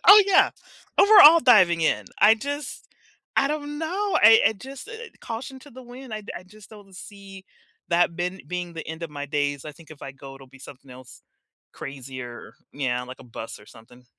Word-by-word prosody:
Oh 415 +1 +10
yeah, 390 - +4 0.5
overall 385 -6 +8
diving 185 -9 +4
in, 160 - 0 0.2
I 215 +2 +7
just 285 +4 -7 0.5
I 275 - +3
don't 295 0 -5
know, 380 +5 -1
I 225 +1 +8
I - - -3
just, 265 +6 -11
eh, 460 0 -9
caution 240 +3 -7
to 285 - -16
the 260 +1 -13
wind, 245 -1 -10
I 215 - -7
I 175 - -9
just 210 +2 -18
don't 205 -3 -15
see 195 0 -12 0.4
that 170 -1 +1
ben 180 +2 -3
being 180 -1 -5
the 165 -1 -8
end 160 +1 -8
of 165 - -6
my 145 -1 -7
days, 145 -1 -2
I 150 - -8
think 160 +1 -19
if 150 - -13
I 135 - -8
go, 135 0 -12
it'll 135 0 -15
be 135 +1 -18
something 135 0 -14
else 125 0 -15 0.5
crazier, 130 -3 -9 0.2
yeah, 125 -3 -2
like 130 +1 -11
a - - -14
bus 115 -2 -9
or 105 - -18
something. 120 +2 -18
180 Hz, 200 wpm, -23 LUFS, -, 0.5 s, Oh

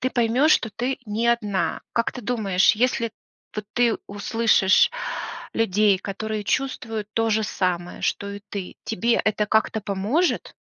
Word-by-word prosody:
ты 255 - 0
поймешь, 245 +6 +3
что - - +2
ты 250 +4 -2
не 220 +3 0
одна. 210 -5 0
Как 230 - +1
ты 250 - -8
думаешь, 205 -5 +2
если 235 0 +1 0.4
вот 215 - -4
ты 240 -2 +3
услышишь 205 -1 +3 0.6
людей, 210 -2 +3
которые 210 +2 -4
чувствуют 225 -4 -2
то 225 0 +2
же 220 0 +2
самое, 175 -4 -2
что 200 - -1
и 200 0 -7
ты, 195 -3 -6
тебе 235 +6 +1
это 215 0 +1
как-то 220 +1 +1
поможет? 205 - 0
220 Hz, 145 wpm, -24 LUFS, 200-235 Hz, 0.6 s, поймешь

